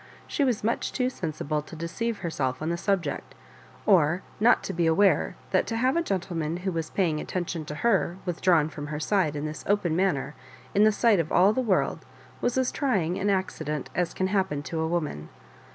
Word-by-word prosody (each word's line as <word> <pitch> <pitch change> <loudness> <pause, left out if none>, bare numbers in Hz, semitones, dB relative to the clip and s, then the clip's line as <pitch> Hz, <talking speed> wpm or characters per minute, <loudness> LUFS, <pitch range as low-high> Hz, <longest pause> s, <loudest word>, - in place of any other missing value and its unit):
She 285 - -1
was 250 -6 +1
much 230 +2 0
too 255 -1 0
sensible 155 - -3
to 155 - -11
deceive 205 +8 -3
herself 130 -6 -1
on 155 - -2
the 170 - 0
subject, 175 -5 -2 0.5
or 175 -2 +4 0.2
not 235 +3 +4
to - - -4
be 170 -1 +1
aware 190 +5 +3 0.2
that - - +2
to 225 - -2
have 255 +5 +2
a 335 - +3
gentleman 170 - -2
who 190 - +1
was 165 -2 -3
paying 165 -6 0
attention 175 -3 -3
to 150 - -6
her 190 -3 +1
withdrawn 175 -3 +3
from 145 -1 -7
her 150 0 -4
side 160 -2 +1
in 145 +1 -3
this 155 0 -5
open 195 -5 +1
manner 175 -6 0 0.4
in 205 +2 +5
the 215 - +6
sight 215 -2 +3
of 160 -2 -1
all 195 +4 +5
the 260 - 0
world, 210 -7 0 0.4
was 245 - 0
as 260 -1 +2
trying 190 - 0
an 205 - +1
accident 170 -7 -2
as 175 -2 -1
can 185 - 0
happen 190 -8 0
to 165 +2 -4
a 160 - 0
woman. 150 - -2
175 Hz, 200 wpm, -27 LUFS, 155-205 Hz, 0.5 s, the